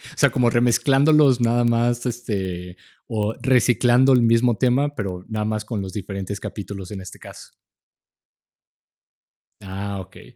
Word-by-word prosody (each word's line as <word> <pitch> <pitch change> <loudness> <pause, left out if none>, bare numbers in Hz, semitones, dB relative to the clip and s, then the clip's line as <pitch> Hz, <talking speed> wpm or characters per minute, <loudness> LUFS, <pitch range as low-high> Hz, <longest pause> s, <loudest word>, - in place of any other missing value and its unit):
O - - -33
sea, - - +4
como 120 -2 +2
remezclándolos 135 +3 +3
nada 120 +1 +2
más, 120 +1 +1
este, 95 -7 -4 0.3
o 110 0 -2
reciclando 125 0 +3
el 125 - +4
mismo 115 0 +3
tema, 140 +3 +1
pero 90 -3 -5
nada 105 -1 -2
más 110 0 -3
con 105 -2 -4
los 95 0 -7
diferentes 100 -1 -5
capítulos, 100 -2 -7
en 95 -2 -6
este 95 - -11
caso. - - -13 2.1
Ah, 100 +1 -6
okey. 95 +6 -15
115 Hz, 140 wpm, -22 LUFS, 100-125 Hz, 2.1 s, sea